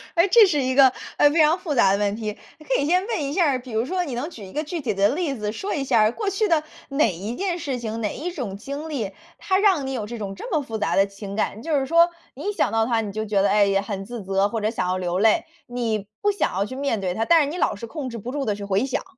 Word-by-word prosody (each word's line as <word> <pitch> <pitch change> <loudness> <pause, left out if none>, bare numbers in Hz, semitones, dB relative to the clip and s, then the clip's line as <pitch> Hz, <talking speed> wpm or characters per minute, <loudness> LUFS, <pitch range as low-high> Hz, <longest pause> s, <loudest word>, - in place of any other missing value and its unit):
哎， 340 +2 +4
这 440 +3 +7
是 305 -7 +1
一 260 0 0
个， 265 -2 +7 0.3
呃， 290 - +6
非 315 +2 +3
常 310 +4 +4
复 300 -5 -3
杂 195 -6 +5
的 200 - +2
问 205 0 0
题。 215 -1 -3 0.3
呃， 310 - -15
可 265 - +2
以 - - 0
先 360 +5 +2
问 370 -11 -1
一 275 - -3
下 345 -1 +3
儿， 260 - 0
比 250 -1 -11
如 220 +2 0
说 365 +5 -1
你 275 - -5
能 265 +7 -3
举 230 - -10
一 190 - -12
个 305 - -1
具 330 +3 -4
体 235 -6 -1
的 200 +1 +3
例 300 -2 -1
子 210 -3 -3
说 385 - -4
一 285 - -1
下 245 -5 +3
儿， 215 +1 +4
过 415 - -2
去 400 +2 0
的 325 -5 +2 0.3
哪 275 - +2
一 200 +8 -5
件 365 0 -2
事 275 -6 -3
情、 225 -1 -4
哪 210 - -1
一 350 +4 -4
种 245 - -5
经 280 +8 -6
历， 230 -10 -3 0.3
它 375 - +1
让 380 -9 +3
你 - - -3
有 230 -5 -3
这 235 +2 -6
种 200 -3 -5
这 - - -8
么 310 -4 +2
复 225 -5 -5
杂 210 - 0
的 195 - +5
情 200 0 -8
感？ 215 0 -2
就 305 -1 +1
是 265 - -1
说， 335 +4 +5 0.3
你 - - -4
一 - - -2
想 - - +1
到 225 0 +2
它， 230 -1 +1
你 205 -2 -5
就 215 +2 -3
觉 205 -2 +1
得， 200 - +3
哎 205 0 +4
呀， 195 0 +2
很 200 -2 -5
自 235 0 -7
责， 195 +1 +1
或 225 0 -3
者 215 - +1
想 225 - -2
要 185 +1 0
流 180 0 -1
泪。 225 +10 +3 0.2
你 230 -5 -2
不 410 - +3
想 400 - -1
要 195 +2 0
去 260 - -7
面 275 -7 -1
对 185 -2 -1
它， 225 +4 -1
但 335 +3 +6
是 285 - -2
你 330 - -5
老 350 - +1
是 205 - -7
控 280 +1 -5
制 235 - -6
不 230 +3 -6
住 280 0 -2
地 210 - 0
去 205 - -8
回 200 +4 +1
想， 270 - -2
245 Hz, 340 characters per minute, -23 LUFS, 210-310 Hz, 0.3 s, 这